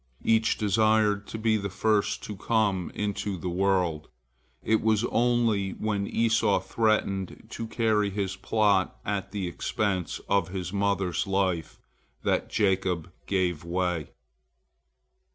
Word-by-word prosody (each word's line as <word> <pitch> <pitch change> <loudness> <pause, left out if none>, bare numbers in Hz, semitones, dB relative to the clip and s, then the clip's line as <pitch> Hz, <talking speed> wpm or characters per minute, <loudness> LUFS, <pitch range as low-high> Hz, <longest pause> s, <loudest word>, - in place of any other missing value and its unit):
Each 110 0 +3
desired 105 0 +2
to - - -5
be 110 0 +2
the 100 -1 -3
first 105 +2 +1
to 105 - -6
come 100 -3 0
into 100 -1 -2
the 90 +1 -4
world. 90 -4 +1 0.6
It 110 0 +2
was 110 0 +2
only 115 -5 +2
when 100 -2 -2
Esau 110 -4 +2
threatened 100 -1 -1
to 115 - -5
carry 110 -3 +1
his 100 -1 -2
point 100 -1 +2 0.2
at 100 -2 -2
the 100 -3 -3
expense 95 +1 -2
of 100 0 +2
his 90 -1 -5
mother's 100 -2 0
life 95 -4 0 0.5
that - - 0
Jacob 95 -4 0 0.2
gave 90 -5 0
way. 90 -3 -1
100 Hz, 125 wpm, -27 LUFS, 95-110 Hz, 0.6 s, Each